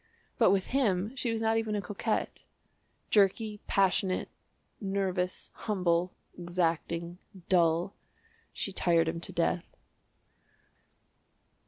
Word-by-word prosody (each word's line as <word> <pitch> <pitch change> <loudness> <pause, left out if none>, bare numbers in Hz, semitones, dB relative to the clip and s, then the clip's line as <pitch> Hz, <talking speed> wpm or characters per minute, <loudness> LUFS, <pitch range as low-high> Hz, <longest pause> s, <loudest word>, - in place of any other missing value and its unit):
But 225 - +6
with 190 -1 +2
him 215 -4 +1
she 250 -2 -2
was 225 0 -1
not 225 0 +3
even 220 -1 -2
a - - 0
coquette 205 +3 -3 0.7
jerky, 210 +1 +2
passionate, 190 -1 +2 0.5
nervous, 190 -3 -2
humble, 180 -4 0 0.2
exacting, 170 0 -2 0.3
dull 170 +1 +3 0.6
she 195 - -4
tired 170 -3 +3
him 165 +1 -2
to - - -7
death. 170 +1 -1
185 Hz, 105 wpm, -30 LUFS, 175-210 Hz, 0.7 s, But